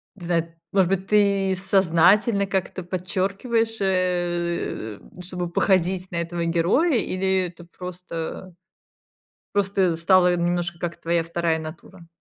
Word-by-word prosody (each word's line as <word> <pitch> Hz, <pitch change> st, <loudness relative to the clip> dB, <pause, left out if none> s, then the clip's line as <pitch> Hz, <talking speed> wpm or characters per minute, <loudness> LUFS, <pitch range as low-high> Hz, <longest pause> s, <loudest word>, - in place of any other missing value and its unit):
не 185 Hz, -4 st, -10 dB
знаю, 165 Hz, -1 st, -1 dB, 0.2 s
может 190 Hz, -3 st, +3 dB
быть, 195 Hz, 0 st, -1 dB
ты 200 Hz, -2 st, +3 dB
сознательно 195 Hz, +4 st, +4 dB
как-то 190 Hz, -1 st, -2 dB
подчеркиваешь, 200 Hz, +5 st, -1 dB
э, 175 Hz, -, -1 dB
м, 180 Hz, -, -14 dB
чтобы 180 Hz, -1 st, -4 dB
походить 185 Hz, +1 st, +1 dB
на -, -, -5 dB
этого 170 Hz, 0 st, -2 dB
героя, 175 Hz, -, +2 dB
или 190 Hz, -2 st, 0 dB
это 175 Hz, 0 st, -13 dB
просто, 180 Hz, 0 st, -7 dB, 1.0 s
просто 195 Hz, -4 st, +1 dB
стало 180 Hz, +1 st, +4 dB
немножко, 175 Hz, 0 st, -1 dB
как 170 Hz, 0 st, -5 dB
твоя 170 Hz, 0 st, +1 dB
вторая 165 Hz, -1 st, 0 dB
натура? 170 Hz, +3 st, -10 dB
180 Hz, 125 wpm, -24 LUFS, 170-195 Hz, 1.0 s, сознательно